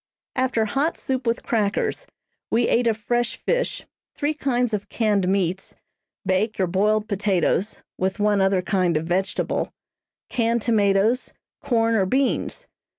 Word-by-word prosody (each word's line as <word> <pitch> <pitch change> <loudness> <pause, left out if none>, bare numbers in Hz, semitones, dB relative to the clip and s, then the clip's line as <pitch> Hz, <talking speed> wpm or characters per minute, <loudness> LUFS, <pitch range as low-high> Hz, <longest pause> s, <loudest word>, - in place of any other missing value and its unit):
After 255 -4 +1
hot 280 +9 0
soup 260 -3 -3
with 230 +1 0
crackers, 220 - -1 0.4
we 235 +1 +2
ate 240 0 +2
of 220 -2 +2
fresh 240 +2 -1
fish, - - -1 0.3
three 295 +1 0
kinds 250 -5 0
of 205 0 -3
canned 210 -5 +1
meats, 190 -1 -1 0.5
baked 200 +3 0
or 190 - +3
boiled 210 +4 +1
potatoes, 200 -1 0 0.2
with 190 +3 -1
one 205 -1 +3
other 190 -1 +2
kind 180 -4 +1
of 155 - -3
vegetable, 185 +3 -1 0.6
canned 230 -2 0
tomatoes, 215 +1 +2 0.3
corn 230 -2 +2
or 195 -4 +2
beans. 265 +6 0
215 Hz, 140 wpm, -23 LUFS, 195-240 Hz, 0.6 s, or